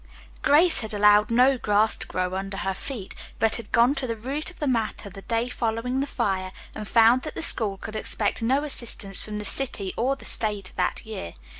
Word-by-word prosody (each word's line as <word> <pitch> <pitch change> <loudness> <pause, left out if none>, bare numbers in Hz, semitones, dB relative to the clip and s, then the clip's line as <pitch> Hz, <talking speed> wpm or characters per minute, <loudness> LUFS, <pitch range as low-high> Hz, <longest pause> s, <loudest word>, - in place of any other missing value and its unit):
Grace 320 +4 +4
had 220 -1 -5
allowed 210 +2 +4
no 250 +3 +3
grass 210 0 +2
to - - -8
grow 185 0 -3
under 195 +1 -4
her 195 -1 -2
feet, 210 0 -8 0.2
but 225 0 +1
had 230 -3 -10
gone 235 +4 +4
to 270 -3 -4
the 230 - -3
root 270 +9 -5
of 360 - -16
the 295 - -3
matter 225 -5 -2
the 195 +1 -11
day 230 +3 -2
following 240 +1 -2
the 280 - -1
fire, 190 -7 -2 0.2
and 215 -1 -7
found 230 +3 +4
that 310 - -8
the - - -4
school 205 -10 +2
could 215 +2 -9
expect 215 +1 0
no 265 +5 +1
assistance 230 -8 +2
from 210 -1 -4
the 210 - -6
city 205 -8 +2
or 260 +4 0
the 275 - -12
state 205 -4 0
that 180 - -2
year. 215 - -7
225 Hz, 210 wpm, -24 LUFS, 205-255 Hz, 0.2 s, Grace